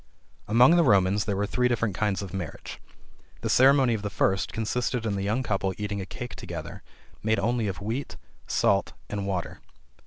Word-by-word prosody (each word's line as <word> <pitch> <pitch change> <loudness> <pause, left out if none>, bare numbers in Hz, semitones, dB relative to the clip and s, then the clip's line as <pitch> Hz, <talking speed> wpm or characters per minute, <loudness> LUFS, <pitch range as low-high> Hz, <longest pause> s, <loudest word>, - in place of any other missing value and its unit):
Among 125 +9 +6
the 170 - +5
Romans 100 - +3
there 105 -2 -1
were 100 +1 0
three 125 +4 +1
different 115 -4 0
kinds 100 +1 -1
of 95 - -8
marriage. 90 -5 -6 0.6
The - - -1
ceremony 135 -1 +5
of 110 - -2
the 105 - -3
first 95 0 0
consisted 115 +2 -2
in 105 - 0
the 100 - -2
young 110 +6 0
couple 95 -4 -1
eating 105 -1 -3
a 95 - -6
cake 125 +3 -7
together - - -7 0.4
made 110 +1 +1
only 115 +2 0
of 95 0 -4
wheat, 115 +7 -4 0.3
salt 100 0 +1 0.2
and 100 -1 -3
water. 90 -3 -3
105 Hz, 185 wpm, -26 LUFS, 100-120 Hz, 0.6 s, Among